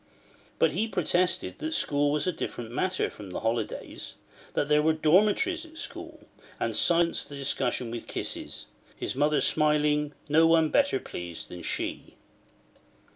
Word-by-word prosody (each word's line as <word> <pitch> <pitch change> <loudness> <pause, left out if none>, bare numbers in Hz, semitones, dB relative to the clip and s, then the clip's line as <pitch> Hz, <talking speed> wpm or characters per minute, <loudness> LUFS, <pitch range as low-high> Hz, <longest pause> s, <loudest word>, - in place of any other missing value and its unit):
But - - +4
he 205 +9 0
protested 180 -2 +1
that 320 0 -2
school 145 0 +2
was 150 0 0
a 180 - +2
different 120 -7 -5
matter 185 +9 0
from 105 -2 -10
the 90 - -5
holidays; 115 0 -3 0.4
that 145 - +1
there 150 0 +4
were 160 +1 +3
dormitories 205 - +3
at 320 -1 -12
school; - - -7 0.4
and - - -1
silenced 170 -3 +2
the 145 - -7
discussion 130 -3 -1
with 120 -1 -6
kisses: - - -4 0.3
his - - -3
mother 150 +2 +2
smiling, 150 -1 +2
no 160 +2 +5
one 165 -1 +4
better 285 - +3
pleased 85 -2 -7
than 90 - -8
she. - - -4
150 Hz, 150 wpm, -28 LUFS, 140-180 Hz, 0.4 s, no